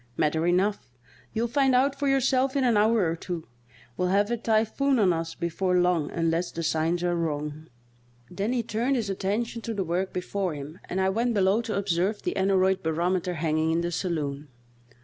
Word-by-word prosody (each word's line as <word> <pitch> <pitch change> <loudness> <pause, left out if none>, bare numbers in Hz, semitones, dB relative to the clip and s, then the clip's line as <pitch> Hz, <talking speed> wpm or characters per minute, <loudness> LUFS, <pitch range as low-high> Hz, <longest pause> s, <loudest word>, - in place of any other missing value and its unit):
"Matter 160 +2 +1
enough! 190 -1 +1 0.4
You'll 230 +1 -1
find 270 +1 +2
out 270 +2 +3
for 280 +1 -2
yourself 270 0 +2
in 275 - +2
an 240 -3 +3
hour 215 -2 +3
or 165 - -1
two. 170 -1 -6 0.5
We'll 180 - 0
have 200 +4 +2
a - - +2
typhoon 230 +5 +1
on 195 -5 +4
us 165 0 -4
before 180 +2 0
long 180 -4 +2
unless 165 +1 -1
the 165 - -4
signs 165 +2 0
are 175 0 +1
wrong." 155 -1 -3 0.6
Then 195 - -3
he 245 -2 0
turned 235 +5 0
his 220 -5 -1
attention 215 +5 -2
to 225 0 -4
the 195 - 0
work 180 +2 -1
before 185 -1 -2
him 145 +4 -8
and 185 - -2
I 190 0 +2
went 230 +4 0
below 195 +3 +3
to 225 -3 -3
observe 195 +1 0
the - - -2
aneroid 190 0 +2
barometer 175 +2 0
hanging 160 0 0
in 165 +1 +1
the 175 0 -2
saloon. 150 -5 -3
190 Hz, 190 wpm, -26 LUFS, 165-225 Hz, 0.6 s, on